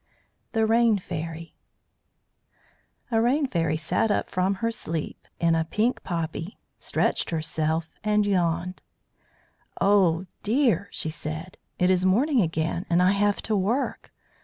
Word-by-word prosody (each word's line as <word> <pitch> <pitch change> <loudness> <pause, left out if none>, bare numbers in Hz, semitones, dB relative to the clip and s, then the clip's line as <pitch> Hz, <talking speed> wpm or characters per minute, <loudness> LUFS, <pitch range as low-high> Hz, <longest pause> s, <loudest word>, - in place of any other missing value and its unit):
THE 225 -1 +2
RAIN 225 -1 +4
FAIRY 165 -2 -6 1.6
A 225 -1 +3
rain 270 +6 +2
fairy 165 - 0
sat 160 +7 0
up 205 - 0
from 185 +2 +1
her 230 +4 -1
sleep 165 -8 -5
in 170 -1 +3
a 165 0 +2
pink 215 +9 0
poppy, 165 +1 -4 0.2
stretched - - 0
herself, 160 0 -1
and 210 -1 +2
yawned. 180 -2 0 1.0
"Oh, 185 -3 +3 0.2
dear!" 230 -2 +2
she 155 - -2
said. 155 +3 -6 0.2
"It 180 +1 +3
is 185 -1 +2
morning 240 +8 +3
again, 165 0 -1
and 170 0 +3
I 180 +1 +5
have 205 0 +1
to 220 - 0
work. 215 +8 -1
185 Hz, 135 wpm, -25 LUFS, 165-215 Hz, 1.6 s, I